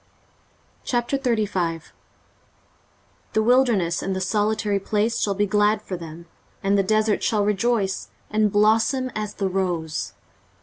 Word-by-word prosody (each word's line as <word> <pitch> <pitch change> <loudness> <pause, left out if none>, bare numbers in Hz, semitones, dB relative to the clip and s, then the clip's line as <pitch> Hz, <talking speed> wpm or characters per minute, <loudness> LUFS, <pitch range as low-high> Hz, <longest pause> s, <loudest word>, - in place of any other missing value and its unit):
23:035:001 220 - -1 1.4
The 220 - +2
wilderness 230 -8 +3
and 195 - -2
the - - -2
solitary 205 +1 0
place 210 +3 0
shall 200 -1 0
be 205 +1 +2
glad 210 +1 +2
for 190 - -5
them; 170 -1 -9 0.4
and 195 +1 +2
the 200 - +4
desert 215 +2 +1
shall 210 -3 +1
rejoice, 210 -1 0 0.2
and 215 -1 +2
blossom 225 +5 +2
as 210 -1 -4
the 195 - -1
rose. 175 -5 -2
210 Hz, 125 wpm, -23 LUFS, 190-220 Hz, 1.4 s, the